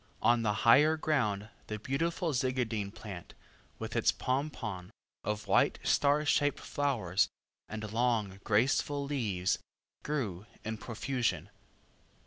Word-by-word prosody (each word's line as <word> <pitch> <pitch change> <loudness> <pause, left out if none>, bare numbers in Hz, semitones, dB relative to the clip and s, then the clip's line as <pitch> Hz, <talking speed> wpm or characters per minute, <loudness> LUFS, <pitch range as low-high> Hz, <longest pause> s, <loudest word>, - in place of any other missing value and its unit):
On 120 0 +5
the 105 -2 +1
higher 150 +7 +7
ground 110 -10 0 0.2
the 110 - -3
beautiful 165 - -1
Zygadene 120 -6 0
plant, 100 -5 -9 0.4
with - - -5
its - - +4
pompon 125 -9 -3 0.3
of 105 +1 -2
white - - +3
star 145 +1 +3
shaped 145 0 +2
flowers, 110 -10 0 0.4
and 110 0 -5
long 115 -5 +1
graceful 135 +6 +2
leaves, 105 -11 0 0.4
grew 110 -10 -3 0.2
in 110 0 -4
profusion. 120 +2 -2
115 Hz, 115 wpm, -32 LUFS, 105-140 Hz, 0.4 s, higher